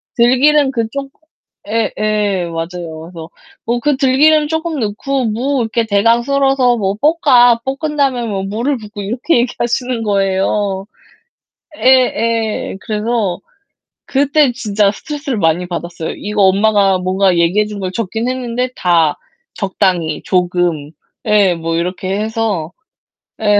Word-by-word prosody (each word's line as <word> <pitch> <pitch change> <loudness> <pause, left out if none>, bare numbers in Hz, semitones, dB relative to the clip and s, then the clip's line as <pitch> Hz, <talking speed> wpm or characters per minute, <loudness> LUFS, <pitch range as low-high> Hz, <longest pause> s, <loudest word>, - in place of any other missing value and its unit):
"들기름 270 +4 +4
그쪽" 265 +3 -3 0.6
예 225 +1 0
예, 210 -4 0
맞아요. 165 -1 -6
그래서 165 -1 -10 0.4
"뭐 235 +1 0
그 290 0 +1
들기름 295 +3 +4
조금 320 0 -2
넣고 245 +5 -2
무 250 +5 -1
이렇게 230 0 -1
대강 225 +3 +3
썰어서 270 -2 +2
뭐 195 -2 -1
볶아. 260 -6 +4
볶은 285 +3 -3
다음에 260 -4 +1
뭐 195 -3 -3
물을 230 +8 -2
붓고." 210 -2 -9
이렇게 240 +10 0
얘기하시는 240 0 -1
거예요. 195 -1 0 0.9
예 - - -7
예. 230 -5 +2
그래서 210 -3 -2 0.7
그때 285 0 +2
진짜 210 -4 +1
스트레스를 285 +2 -5
많이 165 +1 +1
받았어요. 170 -2 -5
이거 210 0 -1
엄마가 195 0 +3
뭔가 185 0 +1
얘기해 175 +5 +2
준 210 -1 -7
걸 185 -2 -3
적긴 225 +2 -3
했는데 250 -1 -2
다 165 -4 +2 0.4
적당히, 185 -5 -1
조금 175 -5 0 0.3
예 205 -4 +3
뭐 165 0 -3
이렇게 180 +3 -2
해서 215 -7 -2 0.7
예. 205 -1 +4
215 Hz, 270 characters per minute, -16 LUFS, 190-255 Hz, 0.9 s, 들기름